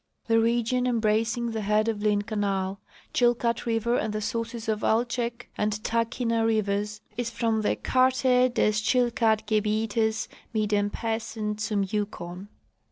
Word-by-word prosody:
* -, -, -50 dB
The 225 Hz, -1 st, +3 dB
region 235 Hz, +2 st, +1 dB
embracing 230 Hz, 0 st, +1 dB
the 220 Hz, -1 st, -3 dB
head 210 Hz, +2 st, +2 dB
of 220 Hz, -2 st, -1 dB
Lynn 210 Hz, -1 st, +2 dB
canal. 200 Hz, -3 st, -2 dB, 0.3 s
Chilkat 240 Hz, -1 st, +1 dB
river, 230 Hz, +1 st, +1 dB
and 215 Hz, -, -2 dB
the 215 Hz, -, -2 dB
sources 230 Hz, +1 st, -3 dB
of 215 Hz, -1 st, 0 dB
Altsek 235 Hz, +1 st, 0 dB
and 210 Hz, 0 st, +1 dB
Tahkeena 230 Hz, 0 st, 0 dB
rivers 210 Hz, -1 st, 0 dB, 0.2 s
is 245 Hz, -1 st, -1 dB
from 230 Hz, -2 st, 0 dB
the 210 Hz, -, +1 dB
Karte 255 Hz, -1 st, +3 dB
des 215 Hz, -, +2 dB
Tschilkat 220 Hz, 0 st, +2 dB
Gebietes 220 Hz, +1 st, 0 dB, 0.3 s
mit 215 Hz, -1 st, +1 dB
dem 205 Hz, -1 st, +2 dB
Piissen 220 Hz, -1 st, -3 dB
zum 210 Hz, -2 st, 0 dB
Yukon. 190 Hz, -2 st, -4 dB
220 Hz, 145 wpm, -26 LUFS, 210-235 Hz, 0.3 s, The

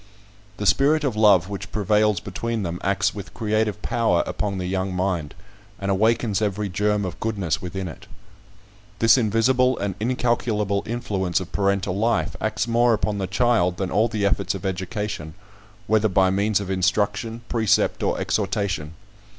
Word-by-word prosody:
The 105 Hz, -, -4 dB
spirit 150 Hz, +8 st, +3 dB
of 135 Hz, -6 st, -1 dB
love 100 Hz, -5 st, +5 dB
which 100 Hz, 0 st, -6 dB
prevails 105 Hz, -1 st, +2 dB
between 115 Hz, -2 st, -3 dB
them 85 Hz, -1 st, -4 dB
acts 100 Hz, +1 st, +1 dB
with 100 Hz, -2 st, -9 dB
creative 110 Hz, -2 st, -1 dB
power 110 Hz, -7 st, +1 dB
upon 100 Hz, -2 st, -3 dB
the 90 Hz, -, -3 dB
young 95 Hz, 0 st, -2 dB
mind, 90 Hz, -5 st, -2 dB, 0.4 s
and 100 Hz, 0 st, -2 dB
awakens 110 Hz, +1 st, +1 dB
every 105 Hz, -1 st, -1 dB
germ 105 Hz, +2 st, 0 dB
of 90 Hz, -, -6 dB
goodness 100 Hz, -9 st, -1 dB
within 95 Hz, +1 st, -4 dB
it. 95 Hz, +3 st, -10 dB, 0.9 s
This 115 Hz, +1 st, +5 dB
invisible 125 Hz, +2 st, +2 dB
and 100 Hz, -1 st, -2 dB
incalculable 115 Hz, -4 st, 0 dB
influence 100 Hz, -7 st, -1 dB
of 95 Hz, -, -8 dB
parental 100 Hz, -2 st, 0 dB
life 115 Hz, +3 st, 0 dB
acts 110 Hz, +1 st, -1 dB
more 120 Hz, 0 st, +3 dB
upon 105 Hz, -1 st, -2 dB
the 95 Hz, -, -2 dB
child 95 Hz, -3 st, +2 dB
than 95 Hz, -3 st, -3 dB
all 110 Hz, +3 st, +3 dB
the 110 Hz, -3 st, -2 dB
efforts 100 Hz, -1 st, 0 dB
of 95 Hz, -, -7 dB
education, 95 Hz, -3 st, -4 dB, 0.5 s
whether 110 Hz, 0 st, +2 dB
by 95 Hz, 0 st, +3 dB
means 100 Hz, +1 st, +1 dB
of 100 Hz, -2 st, -4 dB
instruction, 105 Hz, +4 st, 0 dB
precept, 110 Hz, -3 st, +1 dB
or -, -, 0 dB
exhortation. 100 Hz, -6 st, -2 dB
100 Hz, 160 wpm, -23 LUFS, 95-110 Hz, 0.9 s, love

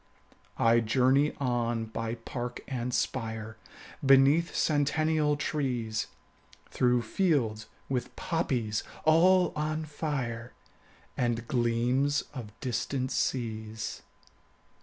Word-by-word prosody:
20 115 Hz, -, +4 dB
I 115 Hz, -, +6 dB
journey 130 Hz, +6 st, +3 dB
on 120 Hz, -3 st, 0 dB
by 115 Hz, +1 st, -4 dB
park 120 Hz, +1 st, -6 dB
and 125 Hz, -2 st, -3 dB
spire, 110 Hz, -3 st, -2 dB, 0.5 s
Beneath 135 Hz, +5 st, +5 dB
centennial 150 Hz, 0 st, +2 dB
trees, 125 Hz, -7 st, -1 dB, 0.6 s
Through 125 Hz, -1 st, +2 dB
fields 115 Hz, -, 0 dB, 0.2 s
with 125 Hz, -2 st, -3 dB
poppies 120 Hz, -10 st, -1 dB, 0.2 s
all 180 Hz, +3 st, +5 dB
on 155 Hz, +1 st, -2 dB
fire, 130 Hz, -6 st, -4 dB, 0.6 s
And 120 Hz, -1 st, -1 dB
gleams 125 Hz, +4 st, +1 dB
of 120 Hz, -6 st, -7 dB
distant 130 Hz, +1 st, -2 dB
seas. 110 Hz, -3 st, -2 dB
125 Hz, 95 wpm, -29 LUFS, 115-145 Hz, 0.6 s, I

